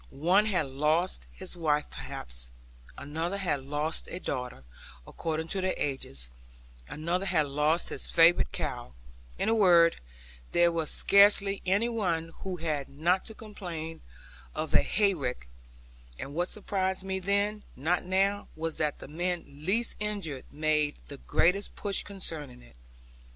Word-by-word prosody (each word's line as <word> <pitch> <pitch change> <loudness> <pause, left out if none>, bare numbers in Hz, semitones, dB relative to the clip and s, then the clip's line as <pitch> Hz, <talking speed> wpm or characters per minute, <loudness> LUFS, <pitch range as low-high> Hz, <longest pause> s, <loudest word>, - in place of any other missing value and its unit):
One 180 +9 +3
had 180 -7 +1
lost 150 +7 0
his 185 -1 -4
wife 150 -3 +1
perhaps, - - -6 0.5
another 160 +7 -3
had 170 -8 -1
lost 150 +3 -2
a - - -5
daughter 125 - -4 0.4
according 160 -1 -3
to 190 - -1
their 185 0 0
ages, 70 - -3 0.6
another 175 - -2
had 160 -5 +2
lost 150 +4 +1
his - - -2
favourite 170 +1 +5
cow; 65 - -4 0.4
in - - 0
a 225 - +4
word, 175 -6 +6 0.6
there 175 0 +5
was 165 -2 -1
scarcely 200 0 +5
any 200 +5 +3
one 175 -8 -1
who 190 -1 -4
had 155 -4 -2
not 170 +7 +1
to 220 - -8
complain 175 -8 -7 0.5
of - - -3
a - - +7
hayrick; 155 - 0 0.7
and 140 - -6
what 175 +3 0
surprised 190 -2 -1
me 190 0 -2
then, 200 +2 0
not 165 +7 0
now, 195 +2 +1
was 160 0 -3
that 150 -2 0
the - - -10
men 175 +3 -2
least 185 +12 -1
injured 200 -10 -3
made 150 -1 +1
the 140 - -7
greatest 180 +8 +1
push 200 -2 0
concerning 160 - -3
it. - - -18
170 Hz, 145 wpm, -29 LUFS, 150-195 Hz, 0.7 s, a